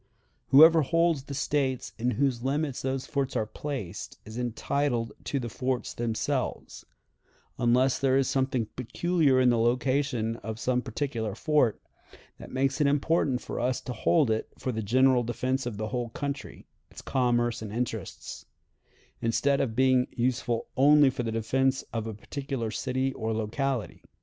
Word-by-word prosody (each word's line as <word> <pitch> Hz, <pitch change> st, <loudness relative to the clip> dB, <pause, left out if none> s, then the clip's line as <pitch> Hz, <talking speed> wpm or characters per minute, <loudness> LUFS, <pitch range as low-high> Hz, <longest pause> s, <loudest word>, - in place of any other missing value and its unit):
Whoever 160 Hz, +4 st, +8 dB
holds 165 Hz, -1 st, +1 dB
the 140 Hz, -, -6 dB
States 130 Hz, -3 st, -1 dB
in 120 Hz, +2 st, +1 dB
whose 130 Hz, -3 st, +1 dB
limits 140 Hz, +1 st, -1 dB
those 130 Hz, 0 st, -2 dB
forts 140 Hz, -3 st, -2 dB
are 110 Hz, -, +1 dB
placed 105 Hz, -, -6 dB
is 110 Hz, +1 st, -9 dB
entitled 120 Hz, 0 st, -1 dB
to 140 Hz, -, -1 dB
the 120 Hz, -, -4 dB
forts 125 Hz, +2 st, -2 dB
themselves, 115 Hz, -2 st, -3 dB, 0.8 s
unless 125 Hz, +2 st, +3 dB
there 135 Hz, -1 st, +3 dB
is 135 Hz, -1 st, +2 dB
something 130 Hz, -3 st, 0 dB
peculiar 140 Hz, +3 st, +1 dB
in 125 Hz, -1 st, +5 dB
the 120 Hz, -, +2 dB
location 125 Hz, -1 st, +1 dB
of 110 Hz, -1 st, -6 dB
some 125 Hz, +1 st, +1 dB
particular 115 Hz, -4 st, -3 dB
fort 150 Hz, -4 st, +2 dB, 0.6 s
that -, -, -10 dB
makes 135 Hz, +2 st, 0 dB
it 145 Hz, -, +4 dB
important 140 Hz, -2 st, +1 dB
for -, -, -5 dB
us 125 Hz, +1 st, 0 dB
to 125 Hz, -, -5 dB
hold 135 Hz, +2 st, +2 dB
it 110 Hz, -, -1 dB
for 130 Hz, -, -3 dB
the 110 Hz, -2 st, -3 dB
general 130 Hz, +4 st, +4 dB
defense 130 Hz, +2 st, -2 dB
of 110 Hz, -4 st, -5 dB
the 110 Hz, 0 st, -3 dB
whole 120 Hz, -1 st, -2 dB
country, 140 Hz, +4 st, -5 dB, 0.2 s
its -, -, -12 dB
commerce 120 Hz, -3 st, +1 dB
and 110 Hz, -2 st, -6 dB
interests, 115 Hz, -3 st, -5 dB, 0.7 s
instead 135 Hz, +5 st, +2 dB
of 115 Hz, -5 st, -2 dB
being 130 Hz, 0 st, +3 dB
useful 120 Hz, -1 st, -1 dB
only 145 Hz, 0 st, +6 dB
for 125 Hz, -, -4 dB
the 115 Hz, -2 st, -2 dB
defense 130 Hz, +4 st, +1 dB
of 115 Hz, -1 st, -2 dB
a 110 Hz, -, -5 dB
particular 135 Hz, 0 st, -4 dB
city 130 Hz, +3 st, -1 dB
or 110 Hz, -2 st, -2 dB
locality. 115 Hz, +2 st, -2 dB
130 Hz, 160 wpm, -28 LUFS, 115-135 Hz, 0.8 s, Whoever